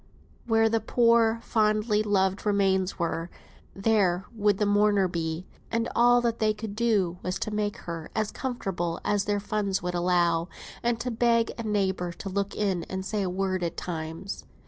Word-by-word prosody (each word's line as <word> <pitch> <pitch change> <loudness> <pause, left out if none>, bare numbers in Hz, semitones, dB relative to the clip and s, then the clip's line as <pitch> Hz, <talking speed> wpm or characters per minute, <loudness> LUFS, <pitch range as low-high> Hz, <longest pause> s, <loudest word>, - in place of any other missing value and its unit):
where 225 -1 +4
the 225 0 +1
poor, 230 0 +3
fondly 215 -1 +2
loved 195 -2 +1
remains 195 -2 +1
were, 170 -1 -2 0.5
there 195 -3 +2
would 205 -3 +2
the 210 - +1
mourner 205 -1 +3
be; 165 0 -3 0.2
and 230 0 0
all 245 +1 +5
that 235 -1 -1
they 215 -1 +2
could 210 -1 -6
do 205 -7 +1
was 185 +1 -2
to 215 - -3
make 210 +1 -1
her 165 -2 -7
as 215 -1 0
comfortable 190 -10 -3
as 205 -1 +1
their 205 0 0
funds 200 -2 -1
would 180 0 -2
allow, 175 -1 +2 0.3
and 235 -1 0
to 245 +1 -2
beg 230 0 +2
a - - -5
neighbour 190 -5 0
to 185 +3 -7
look 200 +1 -2
in 190 -5 0
and 190 0 -5
say 210 +1 -1
a 190 - -1
word 185 0 -1
at 170 -1 -3
times. 165 +3 -5
200 Hz, 175 wpm, -27 LUFS, 180-220 Hz, 0.5 s, all